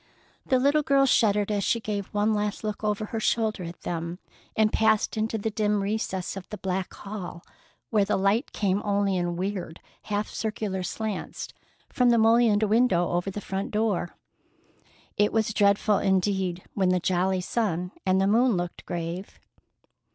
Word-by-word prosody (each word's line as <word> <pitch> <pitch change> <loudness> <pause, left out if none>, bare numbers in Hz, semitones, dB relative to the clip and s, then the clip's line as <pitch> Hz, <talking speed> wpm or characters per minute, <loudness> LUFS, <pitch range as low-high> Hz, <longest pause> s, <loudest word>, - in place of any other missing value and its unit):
The 260 - +3
little 285 +4 +3
girl 275 -1 +3
shuddered 210 -5 +3
as 205 -1 0
she 230 - +1
gave 205 -3 -3
one 210 +1 +1
last 210 0 -2
look 215 0 -4
over 210 0 0
her 225 +1 -4
shoulder 220 -2 0
at 170 +1 -9
them 170 0 -4 0.4
and 215 -1 +3
passed 220 0 +2
into 220 +1 -1
the 220 +1 -2
dim 210 -1 +1
recesses 195 -3 -2
of 195 -2 -8
the 210 - -6
back 190 -1 -2
hall, 190 -4 -7 0.5
where 215 -3 +4
the - - 0
light 200 +7 +1
came 200 -1 0
only 200 -1 +1
in 175 -1 -1
weird, 180 -2 -4 0.3
half 210 0 -1
circular 210 -3 -3
slants 215 +2 -4 0.4
from 250 -1 +2
the 235 - +5
mullioned 225 -1 +4
window 215 -5 +3
over 175 +2 -1
the 195 - -5
front 195 0 -3
door. 210 -5 -1 1.0
It 205 - +3
was 220 -1 +1
dreadful 200 0 +3
indeed 190 -2 0
when 190 -2 +1
the 180 0 +3
jolly 185 +1 +1
sun 180 -4 -1
and 190 -1 +2
moon 235 -2 +4
looked 175 0 -4
grave. 170 +3 -5
205 Hz, 165 wpm, -26 LUFS, 185-220 Hz, 1.0 s, the